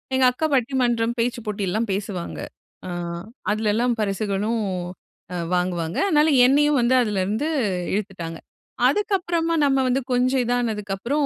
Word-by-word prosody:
எங்க 260 0 +4
அக்கா 250 +6 -2
பட்டிமன்றம், 240 -3 +1
பேச்சு 240 +1 0
போட்டிலாம் 210 +1 -1
பேசுவாங்க. 195 -3 -4 0.5
ஆ - - -5 0.6
அதுலலாம் 220 +3 +1
பரிசுகளும் 205 +2 -1 0.7
அ - - -2 0.2
வாங்குவாங்க. 175 -2 -1
அதனால 310 -3 +4 0.2
என்னயும் 290 +3 +4
வந்து 240 +2 +3
அதுல 210 -5 0
இருந்து 220 +10 -1 0.5
இழுத்துட்டாங்க. 185 -5 -4 0.5
அதுக்கப்புறமா 350 -5 0
நம்ம 270 -1 +3
வந்து 255 +2 +1
கொஞ்சம் 255 +1 +2
இதானதுக்கு 225 -4 -1
அப்புறம் 280 +9 0
235 Hz, 125 wpm, -23 LUFS, 200-265 Hz, 0.7 s, எங்க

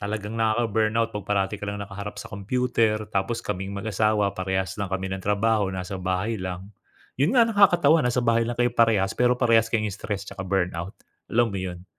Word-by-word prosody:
Talagang 105 +1 -4
nakaka-burnout 110 0 +1
'pag 105 -2 -6
parati 100 0 +1
ka - - -4
lang 100 0 -4
nakaharap 100 +1 -7
sa - - -8
computer. 110 +1 0
Tapos 105 +4 -1
kaming 95 +2 -4
mag-asawa 105 0 +1
parehas 95 -1 -2
lang 100 - -2
kami 95 0 -3
ng 95 - -4
trabaho 105 +1 +1
nasa 95 0 -5
bahay 95 +5 -1
lang. 95 +1 -6 0.5
'Yon 160 - +3
nga, 235 - +7
nakakatawa 175 -8 +4
nasa 125 -2 +1
bahay 115 0 +2
lang 120 - -3
kayo 120 0 +1
parehas, 110 -5 +3
pero 125 0 +2
parehas 115 -2 +3
kay 115 -2 0
stress 100 0 -4
tsaka - - -8
burnout, 90 -1 -2 0.3
alam 120 -1 +2
mo 100 - -3
'yon? 90 -1 -6
105 Hz, 185 wpm, -25 LUFS, 95-115 Hz, 0.5 s, nga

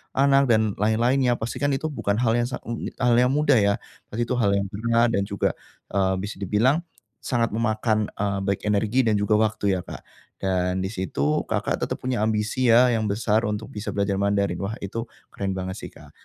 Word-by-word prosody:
anak 140 0 +4
dan 110 -3 +3
lain-lainnya, 120 +4 +2
pastikan 140 +6 -2
itu 155 +3 -3
bukan 100 -7 -1
hal 115 - +3
yang 120 - 0
sang 125 - -6
e 115 0 -4
e - - -8
hal 120 -2 +2
yang 125 +1 +3
mudah 150 -5 +4
ya, 100 0 +3 0.3
pasti 120 +3 -2
itu 125 +2 -2
hal 100 -3 +3
yang 100 0 0
berat 115 +3 +2
dan 100 -3 +1
juga, 100 -2 0 0.4
eee, 95 -1 +1
bisa 105 - -5
dibilang 110 - +2 0.4
sangat 115 -4 0
memakan, 110 -1 0
e 105 - -6 0.2
baik 100 - -1
energi 110 +5 +2
dan 110 -2 +2
juga 105 +1 +2
waktu 105 -2 +1
ya 90 - -3
Kak. - - -8 0.4
Dan 90 0 0
di 95 - -3
situ, 75 -7 -1
Kakak - - -1
tetap - - -2
punya 125 -2 -1
ambisi 110 +3 0
ya 120 +2 +6
yang 110 -2 0
besar, 110 +2 +1
untuk 105 +1 -4
bisa 105 0 -5
belajar 100 -1 0
Mandarin. 100 -3 0
Wah 100 +3 -3
itu, 115 +4 -4 0.2
keren 95 -1 -3
banget 95 +1 -4
sih - - -7
Kak. - - -16
110 Hz, 205 wpm, -24 LUFS, 100-120 Hz, 0.4 s, ya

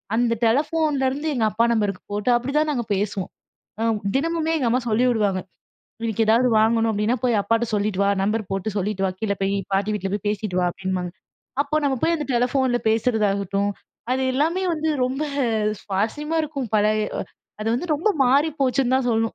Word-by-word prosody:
அந்த 235 0 +2
டெலிஃபோன்லேருந்து 290 +2 +1
எங்க 225 -3 +1
அப்பா 230 +2 +2
நம்பருக்கு 205 -4 -1
போட்டு 210 +4 -1
அப்படிதான் 295 +5 0
நாங்க 240 -5 -2
பேசுவோம். 195 -1 -2 0.5
அ - - +1 0.3
தினமுமே 325 +2 0
எங்க 255 -5 +1
அம்மா 250 - +2
சொல்லி 230 +4 +2
விடுவாங்க. 205 -5 +1 0.6
இன்னைக்கு 225 -1 0
ஏதாவது 240 +3 +4
வாங்கணும் 225 +1 +3
அப்படின்னா, 210 +4 +1
"போய் 230 -4 +3
அப்பாட்ட 230 +3 +1
சொல்லிட்டு 200 -1 0
வா, 200 - +3
நம்பர் 210 0 -1
போட்டு 195 +2 -2
சொல்லிட்டு 195 0 -1
வா - - 0
கீழ 210 -2 0
போய். 195 +1 +1 0.2
பாட்டி 200 +2 +1
வீட்ல 195 -1 -4
போய் 205 0 -4
பேசிகிட்டு 205 -3 -2
வா" 180 - +2
அப்படின்னுவாங்க. 185 -2 -3 0.5
அப்ப 305 +2 -1
நம்ம 270 -2 +1
போய் 335 0 +2
அந்த 300 - -4
டெலிஃபோன்ல 250 0 +1
பேசுறதாகட்டும். 205 -3 +1 0.4
அது 265 +1 0
எல்லாமே 330 +7 +1
வந்து 315 0 -2 0.2
ரொம்ப 265 +4 -2 0.6
சுவாறசியமா 260 +12 -1
இருக்கும். 280 -6 -4
பழைய 210 0 +2 0.5
அது 220 - -1
வந்து 260 - -2
ரொம்ப 330 +9 0 0.2
மாறி 280 +5 +4
போச்சுன்னு 260 -1 +2
தான் 260 -1 +1
சொல்ணும். 225 0 0
230 Hz, 170 wpm, -23 LUFS, 205-270 Hz, 0.6 s, ஏதாவது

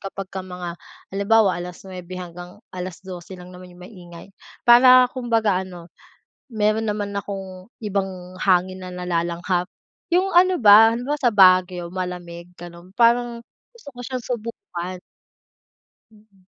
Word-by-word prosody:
kapagka 195 -1 -7
mga 180 -2 -7 0.4
halimbawa, 200 -1 +3
9 180 0 -9
hanggang 175 +1 -10 0.2
12 185 0 -8
lang 180 0 -12
naman 180 0 -12
yung 180 - -17
maingay. 175 -4 -13 0.4
Para 250 +1 +7
kumbaga 225 -6 0
ano, 175 -2 -12 0.6
mayro'n 215 0 +1
naman 205 -1 -3
akong 190 -1 -7 0.2
ibang 190 -3 -4
hangin 185 0 +1
na 185 - -8
nalalanghap. 175 +1 -2 0.5
Yung 370 +2 +2
ano 365 -1 +4
ba, 215 +2 +8
halimbawa 255 +5 -2
sa 245 -5 +2
Baguio, 185 -2 +4
malamig 180 -2 -6
gano'n. 175 +1 -12
Parang 235 0 +3 0.4
gusto 455 -11 -19
ko - - -12
siyang 255 -2 -5
subukan. 185 -7 -6 1.1
Mm. 210 -3 -25
185 Hz, 125 wpm, -22 LUFS, 180-220 Hz, 1.1 s, ba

